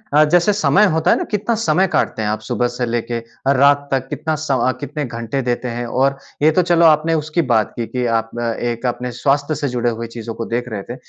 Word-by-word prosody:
अ, 155 - +7
जैसे 175 +6 +3
समय 210 0 +4
होता 160 0 +2
है - - +4
ना, - - -2
कितना 210 +3 0
समय 190 -4 +2
काटते 110 - 0
हैं 105 - -1
आप? 110 - -1
सुबह 120 +3 -1
से 120 0 -3
लेके 120 0 -2
अ, 115 +4 -3
रात 140 +1 +4
तक 135 -1 0
कितना 155 +1 -2
स 155 - -5
अ, 130 -1 +2
कितने 145 +1 -4
घंटे 115 +2 -3
देते 125 0 -2
हैं। 120 0 -4
और 135 +3 +1 0.2
ये 155 +2 +5
तो 185 - +3
चलो 170 -1 +3
आपने 160 +1 +4
उसकी 155 +2 0
बात 110 -2 +2
की 120 - -3
कि 125 -1 -2
आप 115 0 -7
अ, - - -2
एक 120 +1 -3
अपने 125 0 -2
स्वास्थ्य 140 +5 0
से 145 0 -2
जुड़े 120 -1 0
हुए 115 0 -4
चीज़ों 115 0 -7
को 115 - -4
देख 120 +1 -3
रहे 105 -3 -5
थे। - - -7
130 Hz, 250 wpm, -19 LUFS, 120-155 Hz, 0.2 s, अ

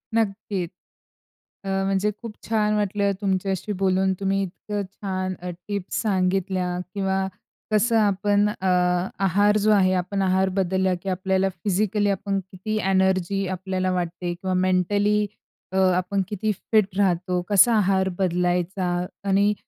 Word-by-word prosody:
नक्कीच. 200 -4 -1 0.9
अ, - - -8 0.2
म्हणजे 195 +2 +1
खूप 230 -3 -7
छान 215 -1 +1
वाटलं 205 -1 +1
तुमच्याशी 195 +1 -1
बोलून. 190 0 +2
तुम्ही 195 0 0
इतकं 205 +3 -5
छान 185 -2 -3
अ, 180 - -5 0.2
टिप्स 200 -2 -3
सांगितल्या 185 -3 0 0.2
किंवा 190 -1 0 0.4
कसं 225 +2 +3
आपण 205 0 +2
अ, 190 -2 -3 0.6
आहार 205 +3 +3
जो 215 - +4
आहे, 190 -3 +4
आपण 185 +2 -1
आहार 190 0 +2
बदलला, 190 0 +1
की 195 - -3
आपल्याला 190 +1 +1
फिजिकली 205 +3 0
आपण 195 0 -1
किती 215 +4 -3
एनर्जी 190 0 +1
आपल्याला 185 0 -2
वाटते 175 0 -2
किंवा 185 +2 -3
मेंटली 205 +3 +2 0.5
अ, 190 - -2 0.2
आपण 185 +2 0
किती 215 +1 -1
फिट 205 -1 0
राहतो. 180 -2 +1
कसा 210 +4 +6
आहार 190 -2 +2
बदलायचा 180 0 0 0.3
आणि 200 +2 +3
190 Hz, 130 wpm, -24 LUFS, 185-205 Hz, 0.9 s, कसा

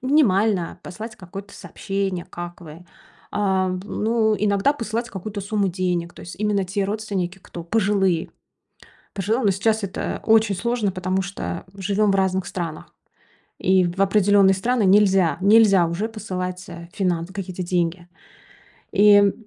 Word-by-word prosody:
минимально 210 - +2
послать 215 +5 -8
какое-то 195 0 -10
сообщение: 195 -3 -4
"Как 175 +1 -8
вы?" 165 +2 -12 0.5
А, 190 -2 +1
м, 185 0 -3
ну, 220 +1 +1
иногда 205 +6 +2
посылать 235 -2 -4
какую-то 200 +1 -6
сумму 200 -1 0
денег, 175 -1 -2
то - - -12
есть 170 - -9
именно 210 -2 +1
те 195 +2 -2
родственники, 195 -3 -3
кто 175 -2 -9
пожилые 195 -3 +1 0.8
пожилые, 215 +6 -1
но 200 - +4
сейчас 215 +3 0
это 195 0 -4
очень 220 -3 +4
сложно, 235 0 -1
потому 185 +1 -1
что 195 +1 -5
живем 200 +2 +1
в - - +1
разных 190 -1 +1
странах 165 -4 -6 0.7
и 185 0 +3
в 175 +2 -4
определённые 195 0 +4
страны 230 +5 0
нельзя 190 -3 +4
нельзя 200 -4 +5
уже 190 +7 -2
посылать, 185 -4 -5
а, 170 -1 -10
финансы, 180 -2 -1
какие-то 185 -2 -5
деньги. 175 0 -1 0.9
И, 205 0 +6
м, 200 -1 +5
195 Hz, 145 wpm, -22 LUFS, 180-210 Hz, 0.9 s, И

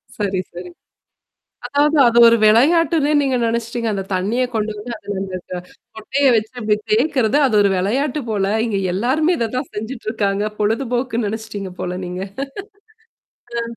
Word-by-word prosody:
சரி, 200 -3 -1
சரி. 180 +1 -8 1.0
அதாவது 295 +2 +2
அது 235 0 +3
ஒரு 230 0 +5
விளையாட்டுன்னே 300 +7 +4
நீங்க 270 -2 +1
நெனச்சிட்டீங்க. 230 0 -2
அந்த 195 -1 -2
தண்ணீிய 210 +8 0
கொண்டு 215 0 -1
வந்து 220 +4 -7
அத 205 -1 -6
அந்த 190 -1 -4 0.6
கொட்டைய 270 +6 0
வச்சு 220 +3 -1
அப்டி 215 -1 +2 0.2
தேக்கறது 250 +1 +2
அது 245 -5 +1
ஒரு 200 - +3
விளையாட்டு 260 +10 0
போல. 205 -3 0 0.2
இங்க 205 -3 -1
எல்லாருமே 280 - +1
இத 230 -1 -1
தான் 255 - -3
செஞ்சுட்டுருக்காங்க. 215 -3 -2
பொழுதுபோக்குன்னு 235 +1 -1
நெனச்சுட்டீங்க 210 -3 -6
போல 180 0 -3
நீங்க. 180 +1 -5 1.4
அ. - - -2
225 Hz, 140 wpm, -19 LUFS, 205-260 Hz, 1.4 s, ஒரு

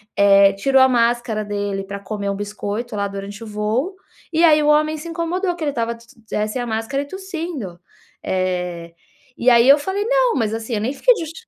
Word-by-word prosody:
eh, 200 0 +6
tirou 265 +6 +3
a 260 - +6
máscara 235 -3 +1
dele 205 -1 -3
pra 200 0 -6
comer 200 0 -5
o 200 - -1
biscoito, 205 +3 -5
lá, 200 0 0
durante 200 +2 -7
o - - -8
voo, 220 - -2 0.4
e 330 +2 +3
aí 305 -2 +6
o - - +1
homem 305 +1 +3
se 335 - -8
incomodou, 350 +2 -2
que 335 - -6
ele 290 - 0
estava 235 -2 -2
se 235 0 -20 0.2
se - - -5
eh, 210 0 0
sem 245 +3 -4
a 240 - -4
máscara 225 +6 -2
e - - -12
tossindo. 330 - -6 0.4
Eh, 180 -2 -2 0.4
e 250 - +3
aí, 240 +2 +5
eu 285 - +9
falei: 385 +6 -2
“Não, - - +2
mas 220 -4 0
assim 225 +1 -4
eu 210 - -2
nem 245 +5 -1
fiquei - - +4
justi" 325 -2 -8
235 Hz, 220 wpm, -20 LUFS, 205-305 Hz, 0.4 s, eu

